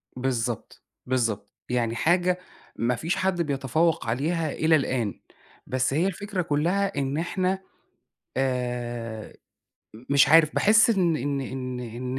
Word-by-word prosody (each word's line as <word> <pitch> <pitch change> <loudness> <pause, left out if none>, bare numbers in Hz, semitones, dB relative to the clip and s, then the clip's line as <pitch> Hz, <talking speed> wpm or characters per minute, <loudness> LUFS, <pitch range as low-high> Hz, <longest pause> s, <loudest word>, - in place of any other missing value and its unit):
بالضبط، 125 -3 -3 0.2
بالضبط. 115 -6 -1 0.2
يعني 120 -2 0
حاجة 180 +5 +2 0.4
ما 120 +1 0
فيش 165 +8 -1
حد 185 -2 0
بيتفوّق 145 0 0
عليها 155 +6 0
إلى 160 0 +3
الآن، 125 -7 -1 0.5
بس 130 +1 0
هي 170 +6 +2
الفكرة 195 0 -3
كلها 175 +6 0
إن 140 +1 -1
إحنا 185 +3 0 0.8
آآ، 120 -4 -3 0.8
مش 140 0 +5
عارف، 155 -1 +6
باحس 220 +3 +5
إن 175 -6 +2
إن 140 0 -2
إن 130 -1 -5
إن 125 +2 -5
140 Hz, 125 wpm, -26 LUFS, 125-170 Hz, 0.8 s, عارف